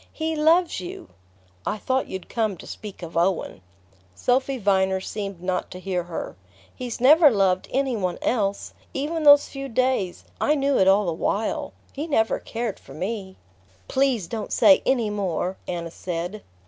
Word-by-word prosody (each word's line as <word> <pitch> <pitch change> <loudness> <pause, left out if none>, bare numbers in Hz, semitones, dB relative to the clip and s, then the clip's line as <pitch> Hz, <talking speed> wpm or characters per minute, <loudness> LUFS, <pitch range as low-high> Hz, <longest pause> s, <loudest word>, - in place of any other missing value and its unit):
He 320 0 -2
loves 325 - +3
you!" 175 - -8 0.5
"I 215 - -2
thought 260 +5 -1
you'd 190 -1 -6
come 220 -5 -1
to - - -11
speak 205 -4 -9
of 170 0 -8
Owen." 170 - 0 0.5
Sophy 260 - +1
Viner 190 -3 +2
seemed 195 -2 -6
not 180 0 -1
to 180 - -8
hear 185 -2 -2
her. 175 -2 -6 0.4
"He's 250 -2 -5
never 295 +5 +7
loved 190 -5 +1
any 265 -2 +1
one 185 -4 -2
else. 200 -4 -1 0.2
Even 310 +4 -2
those 290 -1 +7
few 275 0 -6
days...I 255 +3 0
knew 280 -1 +1
it 190 - +4
all 195 +2 +5
the 170 - 0
while... 205 +6 -2 0.2
he 295 +3 -4
never 225 -8 +1
cared 230 -3 -4
for - - -13
me." 190 +1 -4 0.5
"Please 260 -7 +1
don't 215 +4 -5
say 290 - +6
any 235 -5 +2
more!" 190 -2 -2
Anna 170 -2 -4
said. 175 +4 -5
210 Hz, 160 wpm, -24 LUFS, 185-265 Hz, 0.5 s, never